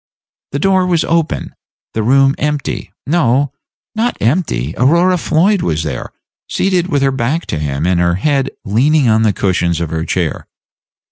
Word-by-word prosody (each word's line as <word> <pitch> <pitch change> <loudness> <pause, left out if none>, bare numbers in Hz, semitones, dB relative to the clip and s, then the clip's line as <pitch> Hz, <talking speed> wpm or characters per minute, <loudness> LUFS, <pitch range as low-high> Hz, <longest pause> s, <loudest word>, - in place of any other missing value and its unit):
The - - 0
door 185 +3 +2
was 170 -3 +2
open; 165 -1 -1 0.4
the 110 - -1
room 135 +4 +4
empty 150 -1 -2
no, 140 -3 +1 0.4
not 230 +2 -1
empty: 110 - 0
Aurora 170 +8 +3
Floyd 180 +4 +2
was 80 -1 -1
there, 75 - -5 0.4
seated 185 -2 0
with 145 -5 0
her 135 - +3
back 130 +6 -1
toward 80 - -3
him, 70 +1 -2
and 90 -1 +2
her 85 0 +2
head 135 +6 0 0.2
leaning 130 +7 +2
on 110 0 +3
the 110 -2 +3
cushions 90 -4 0
of 85 -2 -3
her 80 -1 -2
chair. 85 -3 -2
135 Hz, 160 wpm, -15 LUFS, -, 0.4 s, room